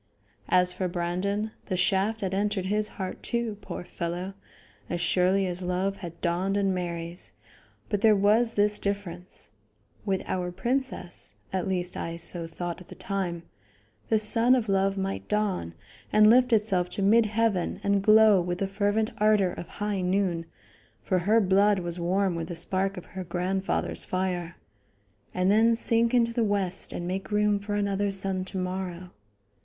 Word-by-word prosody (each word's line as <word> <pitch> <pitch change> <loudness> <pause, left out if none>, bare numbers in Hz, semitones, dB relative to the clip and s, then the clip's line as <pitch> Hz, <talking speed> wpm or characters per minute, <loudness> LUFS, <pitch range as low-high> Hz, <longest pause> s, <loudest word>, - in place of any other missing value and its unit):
As 180 0 +4
for 185 - -2
Brandon, 185 +5 -2 0.2
the 185 - -1
shaft 195 +5 +1
had 190 -1 -2
entered 200 -1 0
his 210 +2 0
heart, 190 -2 -5
too, 235 -3 -2
poor - - -6
fellow, 175 +2 -4 0.6
as 175 - -2
surely 185 +3 +2
as 180 0 -4
love 185 +2 -1
had 170 -4 -8
dawned 185 +3 0
in 195 -1 +1
Mary's, 170 -1 -4 0.5
but 205 -2 -1
there 220 -2 +6
was 215 +4 +3
this 205 0 +2
difference: 185 - -3 0.5
With 195 -2 -1
our 180 -1 -2
princess 215 - -3 0.2
at 190 0 -1
least 180 -2 -1
I 165 0 -4
so 170 0 -2
thought 175 +1 -5
at 180 - -14
the - - -11
time 185 -4 -3 0.7
the 220 - +4
sun 230 +4 +4
of 235 -4 -1
love 195 0 +1
might 195 0 -3
dawn 195 - -1 0.4
and 215 0 +6
lift 250 +1 +5
itself 200 -5 +2
to 200 - 0
mid 220 +3 +5
heaven 210 -4 0
and 200 0 +2
glow 215 -1 +6
with 175 0 -2
the 195 - -1
fervent 205 +2 0
ardor 210 -4 +3
of 175 - -7
high 205 0 -3
noon 180 -2 0 0.6
for 185 -2 +1
her 210 +6 +3
blood 200 +1 +4
was 175 -1 -4
warm 185 +2 +1
with 165 -1 -4
the 175 - -5
spark 190 +3 0
of 180 - -7
her 190 -1 -7
grandfather's 185 +2 -2
fire 180 -2 -2 0.8
and 185 +1 +1
then 225 +2 +4
sink 230 0 +1
into 235 -2 +2
the 235 -1 +1
west 200 -3 +1
and 175 - -4
make 190 +2 -3
room 210 0 +2
for 205 +1 -4
another 200 0 0
sun 195 -1 0
to 190 - -6
morrow. 185 -1 -4
195 Hz, 170 wpm, -27 LUFS, 180-210 Hz, 0.8 s, there